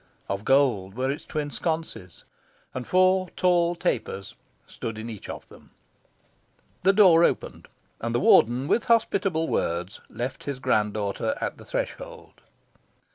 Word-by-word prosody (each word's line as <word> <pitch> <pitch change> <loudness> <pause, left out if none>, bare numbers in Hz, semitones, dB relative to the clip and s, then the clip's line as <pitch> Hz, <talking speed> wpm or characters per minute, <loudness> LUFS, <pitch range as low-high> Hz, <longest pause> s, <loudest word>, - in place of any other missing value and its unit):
Of 100 +1 -3
gold 120 -9 +2
were 130 +2 0
its 145 - -6
twin 150 -1 -3
sconces, 160 - -4 0.5
and 130 -1 -5
four 185 0 +3
tall 175 -1 +2
tapers 110 - -3 0.3
stood 115 -1 -6
in 115 +2 -6
each 105 - -9
of - - -7
them. - - -17 1.1
The 190 - +5
door 185 -5 +6
opened, - - -1 0.3
and 115 +1 -3
the - - +3
Warden, 120 +3 +4
with 235 - +1
hospitable 195 -8 +2
words, 85 +3 -2
left 125 +2 -5
his 140 -2 -3
grand 110 -5 +1
daughter 105 - -2
at - - -4
the - - -12
threshold. - - -6
140 Hz, 140 wpm, -25 LUFS, 110-180 Hz, 1.1 s, door